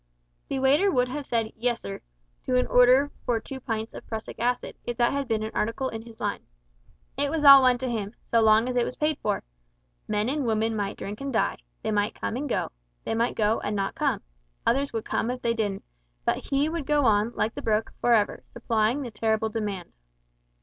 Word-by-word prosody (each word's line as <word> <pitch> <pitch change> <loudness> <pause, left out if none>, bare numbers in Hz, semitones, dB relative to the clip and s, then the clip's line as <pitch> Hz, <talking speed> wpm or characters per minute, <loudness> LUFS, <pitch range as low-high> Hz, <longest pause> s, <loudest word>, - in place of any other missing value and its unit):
The 275 - -2
waiter 280 +9 +4
would 250 -8 +2
have 285 +1 -5
said 225 -2 -1
"Yessir" 230 - -2 0.4
to 255 - 0
an 250 - +3
order 255 +3 +5
for 235 -2 +1
two 265 +3 -8
pints 225 -2 -4
of - - -10
prussic 220 -1 -6
acid, 245 +1 -1
if 240 -1 -4
that 240 -1 +3
had 280 -1 -2
been 220 -2 0
an 220 - -4
article 230 +5 -1
in 225 - -6
his 225 -1 -14
line. - - -2 0.8
It 285 +1 +1
was 310 0 -1
all 275 -1 +11
one 255 -1 +4
to 260 +1 -3
him, 220 -3 -3 0.2
so 230 - +5
long 220 +2 +5
as 255 - -2
it 245 - +3
was 250 - -4
paid 300 -1 0
for. 205 - -1 0.6
Men 210 +1 0
and 285 +2 0
women 225 0 +1
might 205 -1 -2
drink 205 +4 -6
and 275 0 -3
die; 230 - +1 0.3
they - - -1
might 205 +1 0
come - - -3
and 285 +3 -3
go; - - -1 0.3
they - - -2
might 230 +2 0
go 215 +1 +2
and 210 - -3
not 195 -1 -1
come - - -1 0.4
others 275 +3 +2
would 225 -1 -3
come 230 - -1
if 250 0 -4
they 235 - +2
didn't, 205 -4 -2 0.4
but - - -1
he 280 +1 +2
would 320 -3 -4
go 295 -2 +3
on, 215 0 +3
like 220 - 0
the - - -6
brook, 220 0 0
"for 240 - +2
ever," 215 -2 +2
supplying 230 +3 +1
the 240 - -6
terrible 220 0 0
demand. 205 -5 -4
235 Hz, 220 wpm, -26 LUFS, 220-265 Hz, 0.8 s, all